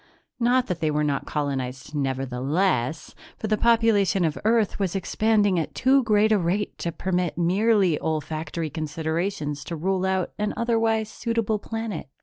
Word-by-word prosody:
Not 245 +1 +3
that 180 -2 -3
they 160 -2 +1
were 150 0 +1
not 145 -2 -1
colonized 135 -2 -3
nevertheless, 135 +2 -1 0.2
for - - -5
the 215 0 +2
population 215 -5 +3
of 155 -1 0
Earth 220 -1 +2
was 195 -2 -1
expanding 205 0 +2
at 160 - -4
too 270 +1 +4
great 215 -2 +3
a 215 - +4
rate 185 +4 -1
to 170 - -2
permit 180 -2 -2
merely 190 -1 +3
olfactory 155 0 -3
considerations 155 0 -3
to 170 - -4
rule 185 +3 -1
out 190 -1 0
an 210 0 -1
otherwise 225 -2 +1
suitable 225 -1 -1
planet. 225 0 -5
185 Hz, 150 wpm, -25 LUFS, 155-215 Hz, 0.2 s, too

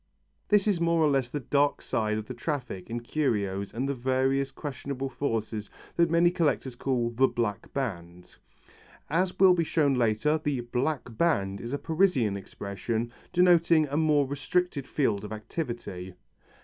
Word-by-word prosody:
This 205 -2 +4
is 190 -5 +1
more 170 0 +2
or 150 - +4
less 135 -3 +1
the 145 - -3
dark 145 +2 +1
side 110 -1 -1
of 110 - -4
the 130 - -6
traffic 120 - -4
in 120 +1 -3
curios 105 -8 -1
and 125 +5 -2
the 140 - 0
various 130 +2 +1
questionable 135 -1 -5
forces 115 -5 -3 0.3
that 170 -1 +3
many 170 +1 +4
collectors 150 -7 0
call 120 -2 0
"the 130 +3 +3
black 115 -4 -3
band." 90 -9 -5 0.7
As 180 +3 +1
will 190 -1 +8
be 170 -2 +1
shown 150 -3 +2
later, 125 +6 +2
the 140 -4 0
"black 125 0 -2
band" 100 -13 +1
is 120 - -6
a 140 - 0
Parisian 155 - +1
expression, 105 +4 -4 0.2
denoting 170 -3 +4
a 140 - -3
more 150 -2 +3
restricted 145 +1 -1
field 110 -9 0
of 105 - -7
activity. 110 - -5
135 Hz, 160 wpm, -28 LUFS, 115-155 Hz, 0.7 s, will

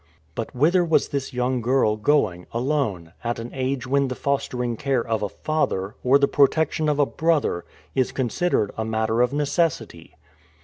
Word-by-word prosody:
But 115 +6 -5
whither 170 +8 +3
was 165 -2 +2
this 140 -1 -3
young 125 0 -1
girl 120 -2 +2
going, 105 -7 +1
alone, 115 - -1
at 120 0 -2
an 115 +1 -7
age 130 0 -2
when 140 +2 +1
the 130 - -4
fostering 125 -4 -1
care 130 -1 -1
of 115 -2 -1
a 105 - -1
father, 105 -9 -2
or 130 +2 +5
the 140 0 +3
protection 155 +2 +2
of 150 - +1
a 145 - +4
brother, 150 - 0 0.3
is 130 -2 +1
considered 130 - 0
a 110 - -2
matter 110 +1 0
of 125 0 +2
necessity? 145 - -1
130 Hz, 170 wpm, -23 LUFS, 110-145 Hz, 0.3 s, or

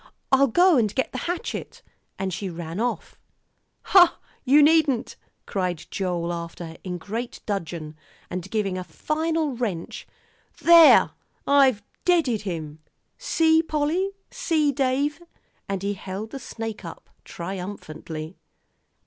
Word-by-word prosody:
I'll 275 +1 +5
go 350 +4 +5
and 215 -4 0
get 260 - 0
the 255 - -4
hatchet 355 +6 -5 0.2
" - - -48
and 190 -1 -3
she 190 +2 -4
ran 170 +1 -6
off. 240 +2 -3 0.6
"Hoh! 360 -3 +6 0.3
you 285 +3 +6
needn't," 295 -5 +3 0.3
cried 180 -4 -2
Joel 175 -3 -2
after 170 0 -6
her, 160 0 -10
in 180 -2 -4
great 225 +8 -5
dudgeon, 165 -6 -4 0.3
and 180 +1 -5
giving 195 -4 -1
a - - -4
final 315 - -1
wrench. 205 -9 -4 0.5
"There, 335 -2 +8 0.3
I've 265 -7 +4 0.2
deaded 320 - +2
him; 160 -6 -5 0.4
see, 320 -9 +3
Polly 320 +4 0 0.2
see, 305 -3 +1
Dave!" 280 +4 0 0.5
and 195 -1 -2
he 200 +1 0
held 195 +3 -6
the 275 - -6
snake 225 -3 -6
up 165 - -9 0.2
triumphantly. 170 -3 -7
220 Hz, 130 wpm, -24 LUFS, 180-295 Hz, 0.6 s, There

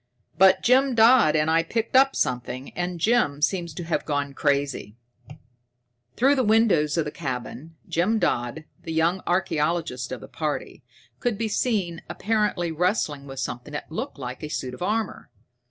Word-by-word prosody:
"But 190 +3 +5
Jim 260 +1 +4
Dodd 225 -7 +6
and 155 0 +2
I 165 +1 +4
picked 225 +8 -3
up 270 +1 +5
something, 125 +1 -2
and 175 0 -4
Jim 185 -9 +2
seems 170 +2 0
to 175 - -5
have 165 0 -1
gone 145 -2 -2
crazy." 140 -6 -1 1.2
Through 270 +4 +4
the 265 -2 +1
windows 210 -9 +3
of 165 - +1
the 150 - -4
cabin, 140 +2 -6
Jim 190 +7 +1
Dodd, 120 - -1 0.2
the 165 - -6
young 165 +4 +1
archaeologist 160 -7 -1
of 130 - -4
the 105 - -11
party, 150 +3 -4 0.4
could 240 -5 -1
be 225 +1 -1
seen 200 -7 -1
apparently 210 -5 0
wrestling 160 -5 -1
with 135 -1 -7
something 125 +5 -5
that 150 - -6
looked 235 - -5
like 125 -2 -6
a 150 - -5
suit 130 -4 -4
of 125 - -11
armor. 215 +3 -2
165 Hz, 165 wpm, -24 LUFS, 145-215 Hz, 1.2 s, Dodd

